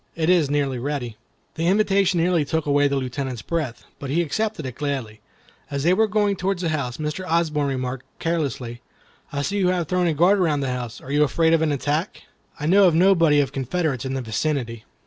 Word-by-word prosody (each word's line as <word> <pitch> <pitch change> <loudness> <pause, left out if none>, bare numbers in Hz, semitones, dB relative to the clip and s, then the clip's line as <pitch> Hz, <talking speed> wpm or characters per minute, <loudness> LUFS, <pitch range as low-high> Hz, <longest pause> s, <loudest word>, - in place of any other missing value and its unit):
It 165 +1 +2
is 165 -6 +3
nearly 140 -3 0
ready." 125 -4 -3 0.4
The 165 +1 -2
invitation 195 -2 +3
nearly 170 -1 +2
took 160 +2 -2
away 145 0 +3
the 140 - -1
Lieutenant's 130 -2 -3
breath, 155 -8 -3 0.2
but 140 - -6
he 170 +5 +1
accepted 215 0 -2
it 130 - -5
gladly. 130 -6 -4 0.5
As 140 -1 -3
they 175 +3 +4
were 220 +4 +3
going 205 -1 +1
toward 190 +1 -1
the 175 -2 -2
house, 140 -6 -2
Mr. 150 +4 -3
Osborne 160 -4 +1
remarked, 130 -1 -4
carelessly, 135 -8 -3 0.5
"I 140 -1 -2
see 200 +6 -1
you 185 - +2
have 180 -3 0
thrown 180 +1 +1
a 160 - 0
guard 180 +6 +4
around 155 -6 +1
the 135 -2 -1
house. 125 -2 -6
Are 135 - -9
you 145 +1 +4
afraid 160 +3 +2
of 165 - +3
an 160 -2 +1
attack? 145 +6 -2 0.4
I 150 - -3
know 190 +4 +6
of 170 - +2
no 190 +4 +5
body 165 -5 +4
of 135 -2 -2
Confederates 140 0 -2
in 135 0 -3
the 135 - -2
vicinity." 115 -1 -2
150 Hz, 215 wpm, -23 LUFS, 135-175 Hz, 0.5 s, know